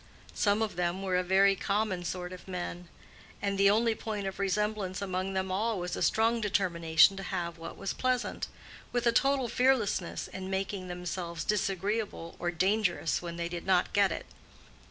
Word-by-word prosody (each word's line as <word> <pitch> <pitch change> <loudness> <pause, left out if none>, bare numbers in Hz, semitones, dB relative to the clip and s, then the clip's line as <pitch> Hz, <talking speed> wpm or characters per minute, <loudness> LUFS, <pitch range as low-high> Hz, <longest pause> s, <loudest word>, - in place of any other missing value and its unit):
Some 205 +1 +2
of 210 -5 -4
them 180 +2 -1
were 185 -2 0
a 180 - +3
very 195 +2 +4
common 200 -2 -1
sort 180 +1 -4
of 185 - -11
men. 180 -1 -5 0.5
And 200 -1 -1
the 195 0 +5
only 225 +2 +3
point 215 -2 -4
of 190 0 -4
resemblance 200 -1 0
among 190 -1 -2
them 190 0 -1
all 215 +3 0
was 180 0 -3
a - - -5
strong 230 +1 +2
determination 180 -4 +4
to - - -4
have 170 -3 -3
what 165 - -8
was 195 -1 -3
pleasant, 255 -1 -1 0.4
with 245 -1 0
a 235 - +5
total 270 +2 +2
fearlessness 240 -8 +1
in 190 0 -6
making 190 0 -2
themselves 175 -1 -4
disagreeable 200 -2 -1
or 175 - 0
dangerous 185 -1 +1
when 170 -1 -5
they 170 0 -2
did 170 +1 -6
not 185 -2 +3
get 200 -2 +4
it. - - -4
195 Hz, 175 wpm, -30 LUFS, 180-210 Hz, 0.5 s, the